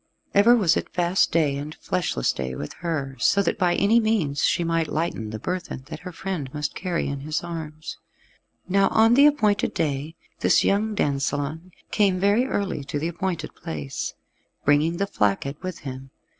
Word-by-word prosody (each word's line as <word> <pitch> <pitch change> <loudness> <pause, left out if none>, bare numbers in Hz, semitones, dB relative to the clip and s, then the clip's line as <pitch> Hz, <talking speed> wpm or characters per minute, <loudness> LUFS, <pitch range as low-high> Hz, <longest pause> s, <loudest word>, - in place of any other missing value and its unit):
Ever 220 +5 +6
was 195 -9 +3
it - - -2
fast 175 +1 +1
day 150 -4 +2
and 150 +2 -6
fleshless 160 - -1
day 65 -1 -4
with 75 - -6
her, 145 -6 -2
so 200 +11 +3
that - - -1
by 175 -2 +3
any 220 +4 +4
means 205 -11 0
she 175 - +2
might 165 -1 0
lighten 150 -9 -2
the 110 - -5
burthen 180 0 -4
that - - -6
her 180 0 -8
friend 165 -6 -4
must 150 0 -2
carry 180 -2 -2
in 140 0 -3
his 155 +4 -3
arms. 155 -2 -6 0.7
Now 195 +1 +3
on 225 +1 +4
the 280 +4 +7
appointed 215 -9 +2
day 150 0 -2 0.2
this - - +4
young 210 +2 +1
dansellon 145 +3 -1 0.2
came 195 -3 +2
very 205 +6 +3
early 200 - -2
to 145 - -3
the 160 +3 -1
appointed 170 -2 -3
place, 75 -4 -5 0.5
bringing 150 +4 +3
the 200 - +1
flacket 140 - -1
with 185 -2 -6
him. 135 -1 -7
165 Hz, 175 wpm, -24 LUFS, 140-195 Hz, 0.7 s, the